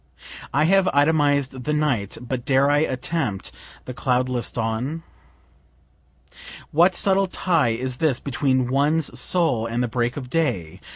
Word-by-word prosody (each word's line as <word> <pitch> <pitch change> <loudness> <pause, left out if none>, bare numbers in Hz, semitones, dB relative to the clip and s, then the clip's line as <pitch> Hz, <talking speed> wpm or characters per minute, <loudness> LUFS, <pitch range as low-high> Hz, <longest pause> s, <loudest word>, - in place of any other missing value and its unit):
I 145 +3 +2
have 190 +3 +3
itemized 145 -2 +2
the 150 - -1
night 135 -10 -1
but 125 0 -5
dare 135 +2 +3
I 145 - +3
attempt 130 - -2 0.3
the 125 - -6
cloudless 125 -1 -1
dawn? 120 +8 -3 1.7
(What 175 +4 +4
subtle 195 +1 +3
tie 160 -10 +1
is 130 0 -4
this 145 -5 +1
between 130 -2 0
one's 145 +3 0
soul 150 -11 +1
and 115 +2 -1
the - - 0
break 120 +3 -2
of 130 -3 -6
day? 125 - -2
135 Hz, 135 wpm, -22 LUFS, 125-155 Hz, 1.7 s, What